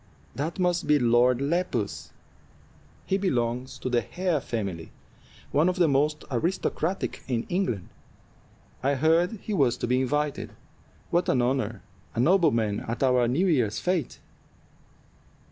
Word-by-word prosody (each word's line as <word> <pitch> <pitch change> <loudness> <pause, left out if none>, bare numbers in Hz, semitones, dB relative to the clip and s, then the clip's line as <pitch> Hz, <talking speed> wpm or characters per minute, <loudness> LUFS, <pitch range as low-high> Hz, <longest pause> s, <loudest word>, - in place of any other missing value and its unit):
"That 155 +5 -3
must 180 -3 0
be 150 0 +5
Lord 120 0 +3
Lepus; 145 - -1 1.0
he 195 - 0
belongs 125 -6 -1
to 130 - -5
the 120 -1 +2
Hare 175 - -1
family, 100 - -4 0.6
one 155 +5 +3
of 180 - -1
the 175 -3 +3
most 150 +2 +1
aristocratic 170 +5 -1
in 120 -3 -1
England. 145 - -1 0.9
I 140 +2 +1
heard 165 - +3
he 215 0 -5
was 130 -9 +2
to - - -2
be 125 +2 +1
invited. 150 +2 -1 0.6
What 175 +1 +2
an 125 -2 +3
honor! 120 -5 -1 0.3
a - - -2
nobleman 125 - +3
at 115 +4 -4
our 125 -2 +3
New 145 +11 +1
Year's 125 - +1
fête." 180 -7 -1
135 Hz, 135 wpm, -26 LUFS, 120-170 Hz, 1.0 s, be